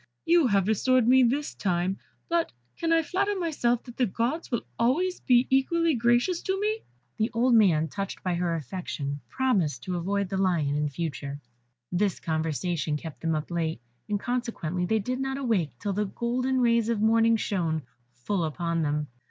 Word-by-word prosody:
You 335 -4 +5
have 200 -3 +3
been 215 - +2
restored 255 +4 +3
to 230 - +2
me 260 0 +7
this 270 +4 +1
time, 185 0 -1 0.3
but 335 0 0 0.2
can 330 -1 -1
I 330 0 +4
flatter 395 +6 0
myself 245 -9 0
that 240 -2 -12
the 250 - +2
Gods 240 - -2
will 235 - 0
be - - -32
always 325 +11 +1
equally 270 +6 +3
gracious 240 +8 +2
to 380 0 -1
me." 430 +2 0 0.4
The 220 +2 +1
old 245 +2 +3
man, 175 -9 +5
touched 195 +6 -5
by 185 - 0
her 170 -1 0
affection, 145 -2 -4
promised 185 - 0
to 180 -1 -2
avoid 200 +2 -1
the 195 - -2
lion 170 -7 +1
in 150 0 0
future. 145 -1 -4 0.5
This 190 +1 0
conversation 160 -1 -1
kept 160 0 -9
them 165 -1 0
up 155 +3 -4
late, 165 -3 -1 0.3
and 205 -1 0
consequently 205 -8 -2
they 220 - +2
did 250 +5 -2
not 270 0 -2
awake 195 - 0
till 200 +7 -2
the 210 +2 0
golden 250 +5 -1
rays 235 -1 +3
of 230 -3 +1
morning 225 +1 +4
shone 165 -8 -1 0.3
full 165 +10 -2
upon 170 +1 -1
them. 150 0 0
210 Hz, 185 wpm, -27 LUFS, 170-255 Hz, 0.5 s, me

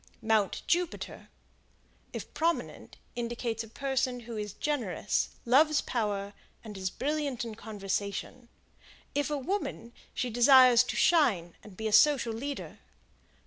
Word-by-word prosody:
Mount 220 -3 +1
Jupiter, 345 0 -2 0.8
if - - -7
prominent, 335 +1 -2 0.2
indicates 235 -1 -3
a - - -11
person 255 0 -2
who 235 0 -8
is 210 -2 -4
generous, 230 - -1 0.2
loves 295 +5 +5
power, 205 -4 -2 0.3
and 215 -2 -9
is 190 -1 -2
brilliant 280 0 -2
in 230 - -6
conversation; 210 +2 -4 0.6
if 290 +1 0
a 295 - -1
woman, 275 - -4 0.2
she 245 -1 -2
desires 250 0 +7
to 245 -2 -4
shine 205 - +3
and 200 -4 -14
be 220 - -5
a 215 - -2
social 260 -5 +5
leader. 275 +5 -6
240 Hz, 130 wpm, -29 LUFS, 215-280 Hz, 0.8 s, desires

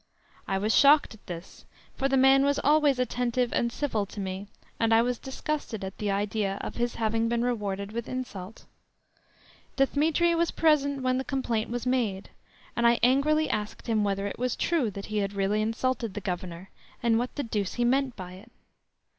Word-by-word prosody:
I 195 - 0
was 210 +3 +1
shocked 290 -2 +6
at 220 - -18
this, 175 0 -8 0.3
for 270 - 0
the 270 - +2
man 270 +1 +6
was 285 0 +2
always 295 -1 +4
attentive 250 -1 0
and 235 -1 +1
civil 225 -7 -1
to 205 - -9
me, 190 +1 -4 0.3
and 225 0 +3
I 225 - +5
was 245 -1 -1
disgusted 265 -5 -4
at 190 0 -7
the 210 - -1
idea 200 0 -1
of - - -5
his 240 0 -2
having 225 0 0
been 235 0 0
rewarded 200 -4 -2
with 235 +1 -5
insult. 220 -6 -6 1.1
Dthemetri 310 +5 +2
was 335 0 +1
present 285 -4 +2
when 255 0 +1
the - - -2
complaint 240 -5 -2
was 245 +1 -3
made, 230 -7 -1 0.4
and 235 0 +3
I 235 0 +4
angrily 295 +5 +3
asked 210 0 -3
him 220 -3 +1
whether 200 -1 -1
it 200 - -5
was 250 0 0
true 320 -10 +1
that 200 0 -7
he 215 - -4
had 200 0 -2
really 200 +2 +1
insulted 230 -1 -1
the - - -2
Governor, 180 -1 -5 0.3
and 230 -1 +3
what 245 +1 -3
the 285 - -2
deuce 210 -4 -2
he 240 - +1
meant 265 +1 +1
by 180 -2 -8
it. 205 +6 -14
235 Hz, 190 wpm, -27 LUFS, 205-265 Hz, 1.1 s, shocked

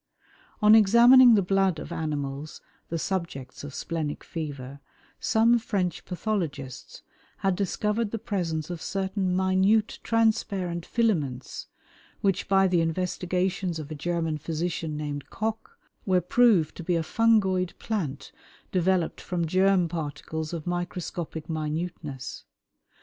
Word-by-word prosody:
On 210 +1 +8
examining 235 +3 +8
the 200 - +3
blood 195 -2 +2
of - - -7
animals, 145 -1 -4 0.3
the 165 - -2
subjects 165 -8 -4
of 145 - -6
"splenic 155 -3 -3
fever," 140 -4 -6 0.4
some 230 +2 +3
French 190 -7 -2
pathologists 170 - -4 0.4
had 190 -1 +3
discovered 210 +3 -1
the 225 - -3
presence 170 -6 -3
of 170 -2 -6
certain 190 -1 -1
minute 190 +4 +2
transparent 200 -6 0
filaments 155 - -1 0.5
which, 195 -2 +1
by 195 0 +4
the 180 -2 +2
investigations 180 +1 -1
of 155 -1 -7
a - - -4
German 165 0 -2
physician 160 0 -3
named 145 -1 -5
Koch, 220 0 -4 0.3
were 185 -1 +4
proved 180 -3 +3
to 175 - -6
be 175 +1 0
a 165 - 0
fungoid 190 -3 +2
plant 165 -12 -4 0.4
developed 185 -2 +1
from 175 -2 -2
germ 185 +1 +3
particles 160 -1 -4
of 165 -3 -5
microscopic 175 -2 -4
minuteness. 155 -3 -4
180 Hz, 120 wpm, -27 LUFS, 155-195 Hz, 0.5 s, On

